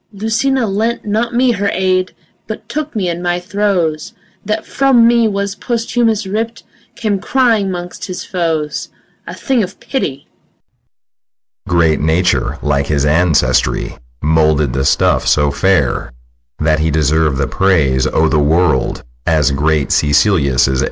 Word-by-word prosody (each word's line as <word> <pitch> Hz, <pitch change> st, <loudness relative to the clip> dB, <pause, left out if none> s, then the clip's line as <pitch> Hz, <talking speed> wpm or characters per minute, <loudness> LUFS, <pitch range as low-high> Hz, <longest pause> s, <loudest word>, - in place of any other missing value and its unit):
Lucina 225 Hz, +5 st, 0 dB
lent 220 Hz, +4 st, -2 dB
not 220 Hz, +3 st, -1 dB
me 250 Hz, 0 st, +3 dB
her 200 Hz, -3 st, -1 dB
aid, 185 Hz, 0 st, 0 dB, 0.3 s
But -, -, -7 dB
took 305 Hz, -3 st, -4 dB
me 195 Hz, -4 st, -1 dB
in 170 Hz, 0 st, -3 dB
my 175 Hz, 0 st, -1 dB
throes, 180 Hz, -5 st, -1 dB, 0.3 s
That 215 Hz, +2 st, -3 dB
from 265 Hz, -4 st, +3 dB
me 235 Hz, -1 st, +3 dB
was 200 Hz, -1 st, -2 dB
Posthumus 230 Hz, -1 st, -1 dB
ripp'd, 225 Hz, +4 st, -4 dB, 0.3 s
Came 210 Hz, -4 st, -1 dB
crying 230 Hz, -4 st, +1 dB
'mongst 175 Hz, -1 st, -6 dB
his 185 Hz, -1 st, -6 dB
foes, 160 Hz, -4 st, -2 dB, 0.4 s
A -, -, -7 dB
thing 265 Hz, -4 st, 0 dB
of 190 Hz, -1 st, -5 dB
pity. 145 Hz, -, -4 dB, 1.4 s
SICILIUS. -, -, -9 dB
Great 85 Hz, -3 st, +2 dB
Nature 80 Hz, +4 st, +1 dB
like 70 Hz, -1 st, 0 dB
his 75 Hz, -2 st, 0 dB
ancestry 75 Hz, -5 st, +1 dB, 0.3 s
Moulded 75 Hz, -3 st, +2 dB
the 65 Hz, 0 st, -1 dB
stuff -, -, +2 dB
so 75 Hz, -1 st, +2 dB
fair 85 Hz, -9 st, 0 dB, 0.5 s
That 80 Hz, 0 st, +1 dB
he 80 Hz, +1 st, +1 dB
deserv'd 75 Hz, -1 st, +1 dB
the 70 Hz, -, 0 dB
praise 75 Hz, -10 st, +1 dB
o' 80 Hz, -, +1 dB
th' 75 Hz, -, +1 dB
world 80 Hz, -3 st, +1 dB, 0.2 s
As 75 Hz, -3 st, +2 dB
great 75 Hz, +1 st, 0 dB
Sicilius' 75 Hz, -3 st, +2 dB
heir. 65 Hz, -1 st, 0 dB
160 Hz, 145 wpm, -15 LUFS, -, 1.4 s, me